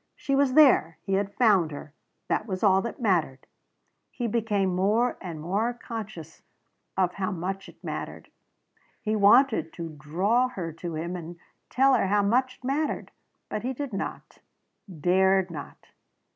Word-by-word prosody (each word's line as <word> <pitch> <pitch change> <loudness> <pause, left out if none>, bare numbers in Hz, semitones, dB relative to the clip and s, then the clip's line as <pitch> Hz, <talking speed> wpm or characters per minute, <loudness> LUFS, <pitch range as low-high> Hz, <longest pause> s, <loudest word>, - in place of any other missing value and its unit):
She 275 - -3
was 275 -2 +3
there. 260 - +5
He 195 - -3
had 200 +1 -1
found 200 -9 +4
her. 145 0 -9 0.3
That 215 - -1
was 185 -1 -4
all 190 -2 +5
that 235 +5 -6
mattered. 170 - 0 0.6
He 245 - -5
became 210 -4 0
more 215 +7 +2
and 170 -4 -6
more 200 +9 -1
conscious 215 -9 -8 0.6
of 180 -2 +2
how 195 0 -2
much 190 +2 -4
it - - -19
mattered. - - -6 0.7
He 220 -2 -1
wanted 215 - +4
to 165 -1 -6
draw 190 +12 +1
her 175 -10 -6
to 165 0 -6
him 170 +3 -4
and 170 0 -8 0.3
tell 270 +1 +4
her 195 - +2
how 205 +1 +2
much 250 +5 +1
it - - -33
mattered. 285 +4 -2 0.4
But 215 - -4
he 255 +2 -2
did 275 -2 -5
not 195 - -6 0.5
dared 190 +2 +2
not. 145 -3 -9
195 Hz, 160 wpm, -26 LUFS, 175-235 Hz, 0.7 s, there